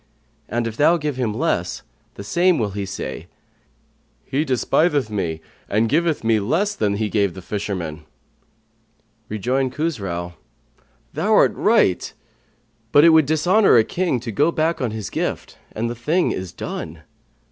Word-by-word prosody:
And 120 +1 -1
if 115 0 -5
thou 165 +4 +4
give 150 -4 -3
him 125 -4 0
less, 90 -4 -2 0.3
the - - -8
same 175 - +2
will 105 -4 -1 0.2
say, 95 - -6 1.0
He 140 +3 0
despiseth 140 0 +1
me 85 -6 -2 0.3
and 110 +3 +2
giveth 160 +3 +1
me 110 -1 +3
less 170 - 0
than 105 - 0
he 110 +1 -1
gave 100 -3 0
the 95 - -8
fisherman.'" 90 -7 -4 1.2
Rejoined 125 +5 -1
Khusrau, 95 - -3 0.8
"Thou - - 0
art - - +5
right, - - +2 0.8
but 145 - +6
it 170 - +8
would 160 -3 +5
dishonour 175 - +4
a 115 - +6
king 175 -1 -1
to 120 -2 -5
go 145 +10 +2
back 160 0 0
on 125 - 0
his 110 -1 -6
gift; - - -4
and 115 +2 -3
the 120 - -3
thing 155 +10 0
is 95 -2 -5
done." - - -7
120 Hz, 150 wpm, -21 LUFS, 100-155 Hz, 1.2 s, it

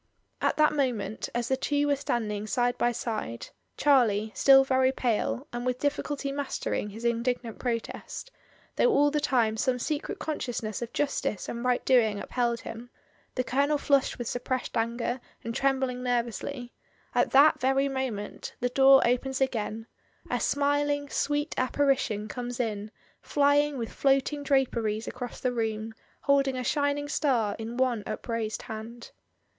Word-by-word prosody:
At - - +1
that 305 0 +4
moment, 240 -7 -1
as 240 -1 0
the 265 - +3
two 290 +2 0
were 290 -1 +3
standing 215 -6 -2
side 245 +1 +1
by 240 - +1
side 215 - -4
— - - -46
Charlie 220 -7 +3
still 270 -1 +7
very 260 -1 +3
pale, 215 - -1
and 240 0 -3
with 250 0 0
difficulty 285 0 -2
mastering 275 -6 -2
his 225 +4 -8
indignant 235 0 -1
protest, 240 - -4 0.5
though - - +4
all 290 -9 +4
the 300 - +1
time 235 -6 +1
some 250 +2 +1
secret 295 +4 -3
consciousness 240 -8 -3
of 235 - -4
Justice 275 -6 -1
and 235 0 -5
right 250 -1 +1
doing 220 -5 +3
upheld 235 0 -1
him, 230 +2 -8 0.5
the 255 - 0
Colonel 280 +4 +1
flushed 280 -1 +2
with 240 - -4
suppressed 250 +1 -3
anger, 235 +2 -1 0.2
and 230 - -4
trembling 265 -1 0
nervously 245 +1 -2 0.2
— - - -36
at - - +2
that 285 +3 +6
very 270 +2 +2
mo 265 -1 -1
ment, 205 -2 -7
the 250 - 0
door 270 +1 +6
opens 260 +2 0
again, 225 -4 -1 0.5
a - - +1
smiling, 285 0 +1
sweet 290 +1 0
ap 255 0 0
parition 260 -7 +1
comes 245 +2 -5
in 215 -3 -2 0.3
flying 290 0 +2
with 230 -2 -4
floating 275 +1 +1
draperies 235 -6 0
across 250 -1 -6
the 255 - 0
room, 220 -1 -2 0.3
holding 275 -2 +2
a 255 - -2
shining 285 +2 0
star 240 -9 +1
in 225 +2 -5
one 255 -4 +1
upraised 220 0 -3
hand. 225 +2 -8
250 Hz, 160 wpm, -28 LUFS, 230-275 Hz, 0.5 s, still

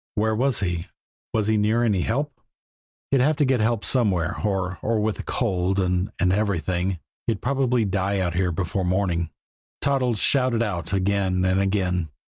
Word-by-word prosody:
Where 110 0 +1
was 125 0 +1
he? 85 -3 -2 0.4
Was 110 -2 +1
he 110 0 +2
near 110 +3 +2
any 105 -6 +2
help? 135 +5 -2 0.7
He'd 135 -2 +4
have 150 +4 +3
to 145 - +2
get 130 -2 +2
help 110 0 +1
somewhere, 95 -9 +1
or 95 -3 -1
or 115 0 0
with 105 0 0
the - - -5
cold 95 -5 0
and 90 +1 0
and 90 -1 +2
everything 95 -2 0 0.3
he'd 110 -4 0
probably 125 -3 +1
die 100 0 0
out 90 -3 0
here 90 0 +1
before 90 +3 -2
morning. 90 -2 0 0.5
Toddles 130 -5 +1
shouted 125 0 +2
out 85 -7 -3
again 95 -1 +1
and 95 +1 +2
again. 95 -4 0
100 Hz, 170 wpm, -24 LUFS, 90-115 Hz, 0.7 s, He'd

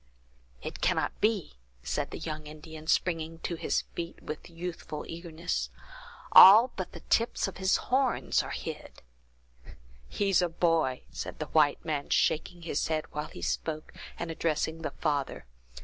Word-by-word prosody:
"It - - -6
cannot - - 0
be!" 205 - 0 0.3
said - - -2
the - - -6
young 155 -1 -5
Indian, 155 +1 -10
springing 165 -2 0
to - - -2
his 165 - 0
feet 170 0 -5
with 155 +3 -7
youthful 170 -2 -6
eagerness; 170 +1 -3 0.6
"all 225 +6 +10
but 185 - -5
the 170 - -9
tips 230 -2 +1
of 195 - -7
his 190 0 +3
horns 260 -1 +1
are - - -7
hid!" - - -7 1.1
"He's 195 - +2
a 175 - +1
boy!" 165 -6 +1
said - - -6
the 155 - -3
white 150 -2 +3
man, 150 -3 -2
shaking 170 +2 +1
his 160 -3 -1
head 155 -1 -1
while 150 +1 -4
he - - -10
spoke, 155 -1 -3 0.2
and 170 -1 -4
addressing 160 0 -1
the 160 - -2
father. 145 - -2
165 Hz, 150 wpm, -29 LUFS, 155-180 Hz, 1.1 s, all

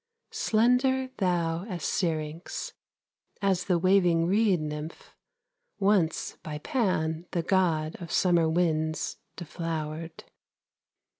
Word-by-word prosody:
Slender 255 +3 +2
thou 170 -3 0
as 180 -8 -6
Syrinx, 160 -1 -2 0.7
As 195 -3 +1
the 180 -3 +2
waving 175 -2 +3
reed 200 0 +3
nymph, 150 +1 -6 0.6
Once 195 -5 +1
by 150 -1 -5
Pan, 165 - -1
the 170 - 0
god 165 -4 +1
of 170 - -7
Summer 170 -3 +3
winds, 160 -2 0 0.2
deflowered. 165 -1 -5
170 Hz, 95 wpm, -28 LUFS, 160-190 Hz, 0.7 s, waving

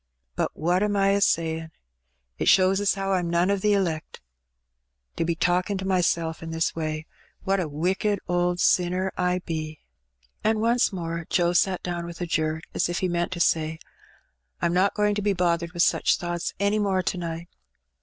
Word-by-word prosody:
But - - -2
what 175 +4 +1
am 210 0 +1
I 195 0 +3
a 200 0 +2
sayin'? 160 -3 +1 0.7
It - - -1
shows 190 +1 +5
as 205 - +2
how 195 0 -2
I'm 175 -2 0
none 170 +3 +2
o* - - +3
the 205 +2 +1
elect, 170 -6 -1
to - - -12
62 - - -48
Hbb - - -53
Benny, - - +2
be 170 - 0
talkin' 180 +3 +1
to 190 - -5
myself 170 -3 0
in 165 - -6
this 165 0 -1
way. 155 -1 -3 0.4
Wliat 195 0 +2
a 175 - -1
wicked 185 +7 0
old 175 0 +1
sinner 180 +2 +2
Ibe!'^ 170 -4 -2 0.7
And. 220 0 +2
once 235 +2 +2
more 170 -3 -4
Joe 175 -1 +2
sat 185 +1 +2
down 175 -1 -3
with 170 -1 -9
a 175 - -2
jerk, 160 -1 -1
as - - 0
if 175 - -2
he 185 - +1
meant 175 0 -1
to 175 - -6
say, 160 -1 +1 0.9
'Tm 170 0 +2
not 185 +3 +2
going 210 0 +2
to 205 - -2
be 205 0 +1
bothered 170 -2 0
with 175 -1 +2
such - - +3
thoughts 175 -1 -3
any 200 +1 +2
more 195 -3 +1
to 180 - -1
night. 170 0 -5
175 Hz, 200 wpm, -25 LUFS, 165-190 Hz, 0.9 s, shows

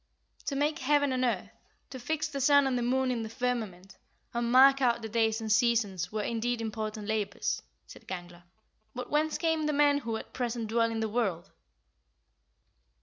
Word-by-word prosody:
9. - - -24
"To 280 - -1
make 300 +3 0
heaven 285 0 +2
and 255 0 0
earth, 245 - -1 0.4
to 260 - -7
fix 310 +5 -2
the 280 -2 -5
sun 285 +1 +5
and 265 -1 0
the 245 - 0
moon 255 +2 +1
in 240 -2 -2
the 220 - -5
firmament, 220 -7 -4 0.3
and 235 0 -1
mark 270 +2 +7
out 235 -2 +2
the - - -3
days 225 0 +1
and 220 -1 -3
seasons, 220 -6 +2
were, 215 -1 -2
indeed, 235 +1 -1
important 215 -1 -4
labours," 210 -2 -1 0.2
said - - -14
Gangler; 175 -1 -7 0.5
"but 250 0 -6
whence 305 +1 +1
came 320 -2 0
the 300 - 0
men 290 0 +4
who 230 -4 -3
at - - -10
present 235 -3 -3
dwell 230 0 +2
in 225 -1 -3
the 220 - 0
world?" 205 -7 -2
235 Hz, 190 wpm, -29 LUFS, 220-270 Hz, 0.5 s, mark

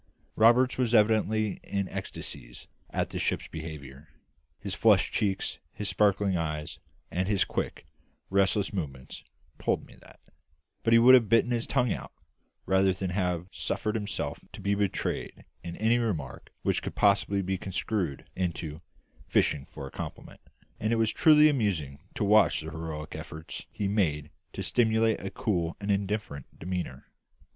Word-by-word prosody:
Roberts 120 +4 +5
was 120 -2 +2
evidently 110 -1 +3
in 100 -1 -2
ecstasies - - -7 0.2
at - - -2
the - - -3
ship's - - -1
behaviour; 75 -3 -8 0.5
his 100 -2 -5
flushed 100 +1 +4
cheek, 100 -3 0 0.3
his 105 -1 -3
sparkling 100 -2 +2
eye, 75 -3 -2 0.5
and 95 +1 -1
his 100 -2 +2
quick, - - -4 0.5
restless 100 +1 +2
movements 70 -9 -5 0.4
told - - 0
me - - -16
that; - - -17 0.6
but 115 - +1
he 115 - +8
would 120 +3 +8
have 120 -5 +6
bitten 115 +2 +4
his 120 -1 0
tongue 125 -4 +2
out, - - -7 0.5
rather 95 0 +3
than 95 0 -3
have 90 -2 -1
suffered 105 - -2
himself 105 -2 -3
to - - -9
be 100 0 0
betrayed 100 -2 -2 0.2
into 85 0 -7
any 115 +3 +3
remarks 100 - -3
which - - +1
could - - -6
possibly 100 -1 +3
be 95 +1 -1
construed 95 -5 -2
into 85 -4 -3 0.5
"fishing 70 -2 +1
for - - -8
a 70 - -9
compliment;" - - -8 0.4
and 110 - 0
it - - +3
was 115 -1 +2
truly 155 -1 +7
amusing 95 - 0 0.2
to - - -1
watch 105 -2 +4
the 80 +1 -7
heroic 80 -1 -6
efforts 80 +1 -8
he 100 - -2
made 80 -8 0 0.2
to - - -5
simulate 110 -2 +2
a 95 - -5
cool 85 -7 -1
and 100 0 -1
indifferent 100 -8 -2
demeanour. 85 -7 -4
100 Hz, 155 wpm, -28 LUFS, 80-110 Hz, 0.6 s, he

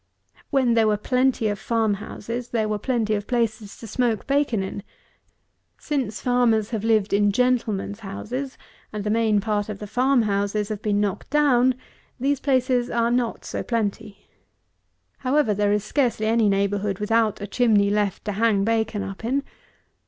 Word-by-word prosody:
When 260 -4 +2
there 225 -1 +3
were 210 -1 +2
plenty 250 +1 +1
of 205 -1 -2
farm 225 -2 +1
houses 230 +4 -6
there 220 -2 0
were 210 -1 -2
plenty 225 -2 0
of 205 -1 -2
places 225 -4 -2
to - - -10
smoke 230 -1 -1
bacon 275 -7 +1
in; 190 +1 -5 1.0
since 260 -8 -3
farmers 240 -4 +2
have 220 -3 -2
lived 220 -3 +2
in 205 0 +3
gentleman's 225 -4 0
houses, 250 +6 -5 0.3
and 210 -1 -4
the 210 - -1
main 220 -2 +2
part 210 0 -1
of 210 - -4
the 210 - -7
farm 250 +4 +2
houses 205 0 -1
have 215 -1 -4
been 205 -1 0
knocked 205 -1 -2
down, 260 -4 +3 0.4
these 275 +2 +1
places 255 -3 +1
are 235 0 +1
not 245 -1 -1
so - - -4
plenty. 215 -2 -3 0.9
However, 265 -4 +2
there 205 0 +1
is 210 -1 +1
scarcely 235 -3 0
any 220 -1 +3
neighbourhood 200 0 0
without 220 +1 +1
a 205 - -4
chimney 205 -2 +2
left 205 -2 -1
to 210 - -1
hang 205 -1 +2
bacon 220 -1 0
up 195 +2 -7
in. 270 +5 0
220 Hz, 165 wpm, -23 LUFS, 205-245 Hz, 1.0 s, there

